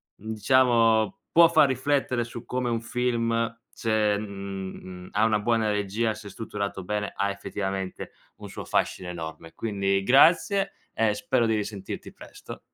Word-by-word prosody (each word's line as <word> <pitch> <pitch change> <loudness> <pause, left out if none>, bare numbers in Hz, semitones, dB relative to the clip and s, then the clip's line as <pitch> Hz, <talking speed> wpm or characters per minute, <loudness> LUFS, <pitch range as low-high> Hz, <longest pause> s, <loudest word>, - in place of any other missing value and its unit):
mhmm, 110 +2 -7
diciamo 115 -2 +3 0.2
può 170 -1 +9
far 155 -4 +5
riflettere 130 -2 0
su 120 0 -9
come 125 -1 -2
un 115 -1 -1
film 115 -1 0 0.2
c'è 110 -2 +1
mhmm, 95 -3 -7
ha 105 +2 +2
una 110 -2 +2
buona 110 0 +1
regia, 105 +2 0
se 105 -1 -10
strutturato 100 -2 -5
bene, 105 0 -2
ha 100 - 0
effettivamente 95 -1 -4 0.3
un - - -9
suo - - -7
fascino 90 -1 -1
enorme. 80 -1 -7
Quindi 100 -3 0
grazie 180 - +4 0.2
e 110 -2 +2
spero 120 +3 +1
di 110 - +2
risentirti 100 -2 -5
presto. - - -11
110 Hz, 145 wpm, -26 LUFS, 100-120 Hz, 0.3 s, può